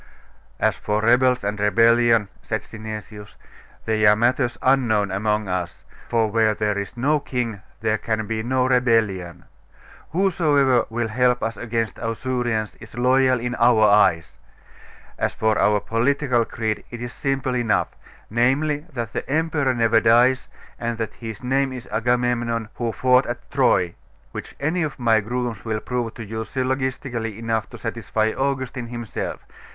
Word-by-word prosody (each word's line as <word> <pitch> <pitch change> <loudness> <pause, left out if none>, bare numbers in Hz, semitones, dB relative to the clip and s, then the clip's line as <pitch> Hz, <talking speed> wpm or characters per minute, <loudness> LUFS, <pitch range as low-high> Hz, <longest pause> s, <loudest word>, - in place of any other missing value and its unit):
'As - - +2
for 105 0 -1
rebels 125 +1 +3
and 105 +1 -2
rebellion,' 115 +1 +4
said - - -3
Synesius, 110 -1 -9 0.5
'they 110 -1 +2
are 105 - +7
matters 120 +2 +1
unknown 115 -7 +2
among 105 +2 0
as; 90 -2 -4 0.3
for 115 -1 +2
where 110 -1 +2
there 105 -1 0
is 100 +4 -5
no 145 +5 +2
king 120 -7 -3 0.2
there 110 -1 +1
can 110 -1 -2
be 110 0 -2
no 125 +2 +1
rebellion. 115 -9 +1 0.6
Whosoever 150 - +2
will 115 0 -2
help 125 +2 +2
us 115 0 -2
against 115 -2 -3
Ausurians 115 -1 -2
is 110 +1 -12
loyal 130 0 +3
in 120 +1 -3
our 115 -2 +5
eyes. 100 -5 +3 0.8
And - - +2
as - - -3
for 110 -1 +1
our 105 -1 +3
political 120 +2 +1
creed, 110 -2 -3
it 120 - -8
is 120 0 -6
simple 135 -2 -1
enough 120 -3 +1 0.4
namely, 145 +7 +1
that 115 -3 -4
the - - -4
emperor 150 -3 +1
never 115 -1 +4
dies, 125 +3 +4 0.3
and 115 -1 -2
that 110 -1 -3
his 110 -2 -8
name 135 +1 +1
is 125 -1 -8
Agamemnon, 120 0 0
who 120 -2 -2
fought 125 +2 +3
at 120 0 -6
Troy; 120 -10 +2 0.4
which - - -8
any 160 +5 0
of 155 -3 -2
my 115 -3 +3
grooms 120 -1 -3
will 110 -2 -2
prove 120 -2 -3
to 115 - -7
you 110 +2 -5
syllogistically 130 -3 -3
enough 115 -1 -2
to 120 - -10
satisfy 110 0 -1
Augustine 130 -2 -2
himself. 120 -2 -5
120 Hz, 155 wpm, -22 LUFS, 110-130 Hz, 0.8 s, are